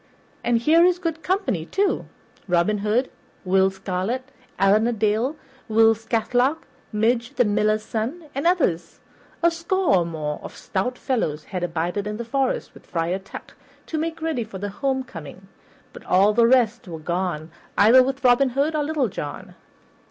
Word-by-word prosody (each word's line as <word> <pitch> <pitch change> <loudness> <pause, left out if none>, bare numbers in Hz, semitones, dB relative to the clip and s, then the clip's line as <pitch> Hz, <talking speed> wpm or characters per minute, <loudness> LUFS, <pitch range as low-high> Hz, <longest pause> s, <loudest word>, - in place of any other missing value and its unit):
And 240 -1 +2
here 315 +8 +4
is 360 0 +4
good 330 -3 -3
company, 370 - -1
too; 395 +1 0 0.4
Robin 180 +4 +2
Hood, 215 +6 0 0.3
Will 190 +1 +4
Scarlet, 195 +7 -3 0.3
Allan 205 +3 +4
a - - +1
Dale, 225 +5 0 0.3
Will 225 0 +5
Scathelock, 230 +6 0 0.3
Midge, 235 +4 0
the 245 - +3
Miller's 215 +1 +1
son, 260 +10 -4
and 275 +5 0
others. 285 - 0 0.4
A 340 - +5
score 335 - +1
or 175 - +1
more 155 -3 -4
of - - -10
stout 230 +6 -2
fellows 160 - -1
had 180 +2 -5
abided 175 +4 -2
in 210 0 -4
the 235 - -5
forest, 265 +2 -1
with - - -17
Friar 170 +2 -1
Tuck, 195 - -11 0.3
to 315 - -3
make 325 0 -3
ready 315 -7 -1
for 215 -3 -9
the 205 +2 -4
homecoming, 200 - -4 0.5
but - - -11
all 195 +3 +4
the 230 +1 +4
rest 245 -3 +2
were 165 -2 -6
gone 170 -1 -3 0.3
either 230 +6 +7
with 265 +1 -2
Robin 255 +2 +5
Hood 280 +5 0
or 300 - +1
Little 295 -4 0
John. 145 -7 -7
225 Hz, 165 wpm, -23 LUFS, 190-270 Hz, 0.5 s, either